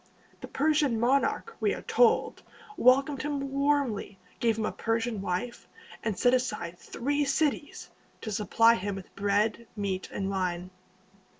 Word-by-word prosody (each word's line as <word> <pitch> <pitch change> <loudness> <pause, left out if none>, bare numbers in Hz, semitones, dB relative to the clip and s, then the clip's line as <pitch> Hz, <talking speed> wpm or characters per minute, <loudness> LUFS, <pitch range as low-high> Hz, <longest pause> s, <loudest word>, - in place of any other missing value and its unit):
The - - -8
Persian 290 -5 +1
monarch, 275 - +1
we - - +1
are - - -9
told, 470 -2 +2 0.3
welcomed 270 - +3
him 275 -1 -3
warmly, 275 -8 0 0.2
gave 230 -2 +1
him 220 - -1
a - - -1
Persian 225 -2 -2
wife, 190 +6 -4 0.4
and 215 -4 -2
set 245 +4 +3
aside 180 -9 -2
three 285 +4 -1
cities 290 +1 -1 0.3
to 220 - -5
supply 225 +3 +4
him 205 -3 -3
with 195 -2 -10
bread, 205 +3 0
meat, 195 -3 -3
and 195 0 -3
wine. 180 -1 -2
230 Hz, 140 wpm, -28 LUFS, 200-275 Hz, 0.4 s, supply